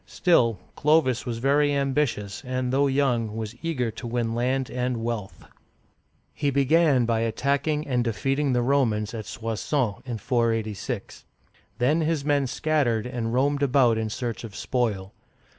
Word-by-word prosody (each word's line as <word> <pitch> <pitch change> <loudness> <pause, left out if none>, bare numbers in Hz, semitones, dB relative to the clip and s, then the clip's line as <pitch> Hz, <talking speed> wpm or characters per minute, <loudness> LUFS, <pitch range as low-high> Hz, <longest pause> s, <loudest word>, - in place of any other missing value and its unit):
Still, 120 - +2 0.2
Clovis 145 -5 +2
was 115 -2 -2
very 145 +4 +2
ambitious, 135 -8 -1
and 130 -1 -2
though 140 +1 +3
young, 125 -6 +1
was 110 -1 -4
eager 130 -9 -1
to 120 +2 -7
win 115 -1 -1
land 130 +2 0
and 125 -1 -2
wealth. 115 -4 -4 0.9
He 145 - 0
began 140 -1 +3
by 115 -1 +1
attacking 140 +6 0
and 125 -3 +1
defeating 135 +4 0
the 120 -1 +2
Romans 120 -5 +1
at 110 -2 -6
Soissons 110 0 -4
(swa 120 -6 -1
s6N'), 120 -3 -5
486. 115 -4 -2 0.5
Then 140 +7 +2
his 155 -3 0
men 145 -2 +2
scattered 135 -5 0
and 120 -2 -3
roamed 140 +4 +1
about 130 -5 +3
in 110 -1 -2
search 120 0 -4
of 110 -4 -8
spoil. 105 -7 -2
125 Hz, 150 wpm, -25 LUFS, 115-140 Hz, 0.9 s, though